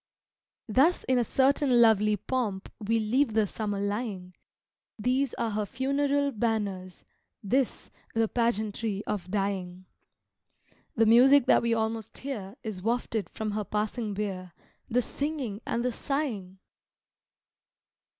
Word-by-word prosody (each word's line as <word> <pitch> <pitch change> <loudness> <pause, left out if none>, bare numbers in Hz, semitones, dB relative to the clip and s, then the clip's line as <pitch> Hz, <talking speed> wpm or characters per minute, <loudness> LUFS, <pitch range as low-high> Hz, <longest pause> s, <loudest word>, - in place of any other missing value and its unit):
Thus 275 +11 +3
in 255 -1 +2
a - - +3
certain 265 +1 +3
lovely 215 -2 +5
pomp 210 -4 -3
We 225 +1 0
leave 225 +3 +1
the 220 -1 +4
Summer 205 0 -3
lying 200 -3 -3 0.6
These 255 +4 0
are 230 -2 -1
her 210 0 -2
funeral 280 +3 0
banners, 205 -6 -2 0.4
this 255 +5 -1 0.2
The 225 0 +3
pageantry 220 -3 -1
of 185 -4 -3
dying! 190 -2 -2 1.1
The 225 - +4
music 250 +4 +7
that - - +5
we 235 -1 +1
almost 220 -1 -3
hear 220 -7 -6
Is 210 -5 -5
wafted 225 -1 -1
from 215 -1 -4
her 210 +1 -2
passing 210 +1 -2
bier 185 -4 -4 0.4
The 250 +1 +2
singing 275 -9 -4
and 235 +1 -1
the 250 - +1
sighing! 230 -10 -3
220 Hz, 125 wpm, -28 LUFS, 205-250 Hz, 1.1 s, music